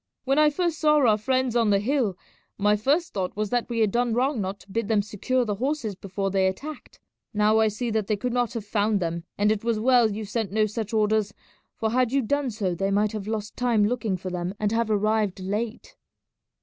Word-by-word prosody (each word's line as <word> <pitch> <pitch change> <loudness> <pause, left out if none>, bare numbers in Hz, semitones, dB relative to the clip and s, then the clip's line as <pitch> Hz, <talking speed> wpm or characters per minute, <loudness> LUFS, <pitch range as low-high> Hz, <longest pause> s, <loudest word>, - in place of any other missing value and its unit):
When 275 +2 +2
I 305 0 +6
first 335 +1 -1
saw 300 -1 +4
our 240 -7 +4
friends 255 +1 0
on 230 -3 +3
the 200 - +4
hill 220 -3 0 0.4
my 205 +1 +3
first 285 +11 0
thought 185 -2 -3
was 210 0 -2
that 245 0 0
we 230 -1 -1
had 215 -2 +3
done 240 0 +1
wrong 255 -1 +1
not 195 +1 -4
to 195 - -17
bid 225 0 -1
them 210 -2 +2
secure 240 +5 -1
the 210 - -1
horses 250 0 -2
before 195 +1 -4
they 190 -1 +2
attacked. 285 +11 -6 0.4
Now 210 +1 +4
I 220 - +4
see 225 +3 -2
that 215 -2 -1
they 215 - +1
could 245 +4 -2
not 245 -2 0
have 230 -4 -5
found 210 0 +1
them; 170 -1 -3
and 210 +1 +3
it 215 -1 -1
was 230 -2 0
well 245 -1 +4
you 215 +1 -4
sent 210 -1 -3
no 215 +1 +2
such 215 0 -4
orders, 215 -1 +1 0.4
for 220 -1 -1
had 250 0 +2
you 275 -1 +2
done 285 +3 0
so 205 -5 -2
they 195 +3 -1
might 205 +1 +2
have 210 -2 -5
lost 215 -1 -4
time 235 -4 +2
looking 215 -4 -1
for 185 +1 -6
them 180 +2 -3
and 210 -1 0
have 230 0 0
arrived 215 -2 +1
late." 210 +5 -4
215 Hz, 230 wpm, -25 LUFS, 205-245 Hz, 0.4 s, I